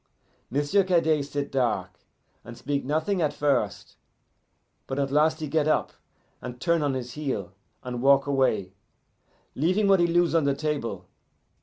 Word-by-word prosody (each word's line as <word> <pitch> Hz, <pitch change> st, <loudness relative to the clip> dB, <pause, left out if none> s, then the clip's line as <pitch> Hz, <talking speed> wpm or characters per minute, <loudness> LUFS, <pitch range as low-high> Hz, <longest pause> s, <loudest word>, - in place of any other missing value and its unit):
M'sieu' 145 Hz, +9 st, +2 dB
Cadet 165 Hz, -5 st, +2 dB
sit 145 Hz, 0 st, -4 dB
dark, 105 Hz, -9 st, -1 dB, 0.4 s
and 120 Hz, 0 st, -10 dB
speak 140 Hz, +2 st, -2 dB
nothing 160 Hz, +7 st, 0 dB
at 150 Hz, -2 st, +1 dB
first, 140 Hz, -9 st, -1 dB, 0.9 s
but 135 Hz, -, -4 dB
at 140 Hz, -1 st, -1 dB
last 155 Hz, +2 st, +2 dB
he 155 Hz, -, -3 dB
get 155 Hz, 0 st, +1 dB
up 155 Hz, -, +1 dB, 0.5 s
and 125 Hz, 0 st, -7 dB
turn 170 Hz, +3 st, +1 dB
on 145 Hz, -2 st, 0 dB
his 125 Hz, -1 st, -5 dB
heel 130 Hz, -12 st, -4 dB, 0.3 s
and 125 Hz, -1 st, -5 dB
walk 140 Hz, +1 st, +5 dB
away, 130 Hz, -9 st, 0 dB, 0.8 s
leaving 185 Hz, +9 st, +1 dB
what 195 Hz, -1 st, +5 dB
he 175 Hz, -, +3 dB
lose 175 Hz, 0 st, +2 dB
on 165 Hz, -3 st, +3 dB
the 140 Hz, -1 st, +1 dB
table. 140 Hz, -12 st, -3 dB
145 Hz, 155 wpm, -26 LUFS, 130-160 Hz, 0.9 s, walk